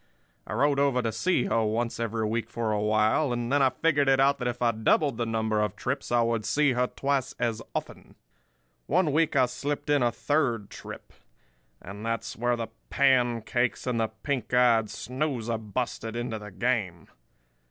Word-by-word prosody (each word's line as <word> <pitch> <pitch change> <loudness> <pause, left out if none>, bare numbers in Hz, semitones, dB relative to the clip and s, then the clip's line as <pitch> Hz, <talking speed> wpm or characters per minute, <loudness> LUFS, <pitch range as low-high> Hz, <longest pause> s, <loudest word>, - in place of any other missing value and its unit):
I - - -5
rode 145 -1 +2
over 135 -3 +2
to 115 - 0
see 130 - +1
her 115 - +1
once 115 +2 -1
every 115 -1 -1
week 115 +2 -2
for 115 -2 -2
a 105 -1 0
while; 110 +6 +2
and 120 0 -2
then 145 0 +3
I 135 - +5
figured 145 -2 +1
it 135 0 +4
out 140 +1 +3
that 125 - -2
if 120 0 -3
I 120 -1 +3
doubled 115 +4 +1
the 120 -1 -1
number 110 -1 0
of 105 -3 -1
trips - - -3
I 120 -1 +4
would 115 -1 0
see 145 +5 +2
her 125 0 +1
twice 135 -1 -2
as 115 -1 -1
often. - - -6 0.7
"One 170 -1 +2
week 155 +1 +2
I 130 -2 +5
slipped 145 +4 -3
in 145 -2 +3
a 120 -1 +3
third 120 -6 -1
trip; - - -10 0.7
and 100 +3 -9
that's 115 0 -3
where 120 +1 +1
the 115 -2 -4 0.2
pancakes 120 -3 +1
and 125 -2 -1
the 110 - +1
pink 115 +2 -4
eyed 115 -3 +4
snoozer 125 -3 -3
busted 115 +1 -4
into 120 -2 -3
the 105 0 -9
game. 100 -5 -1
120 Hz, 185 wpm, -27 LUFS, 110-135 Hz, 0.7 s, I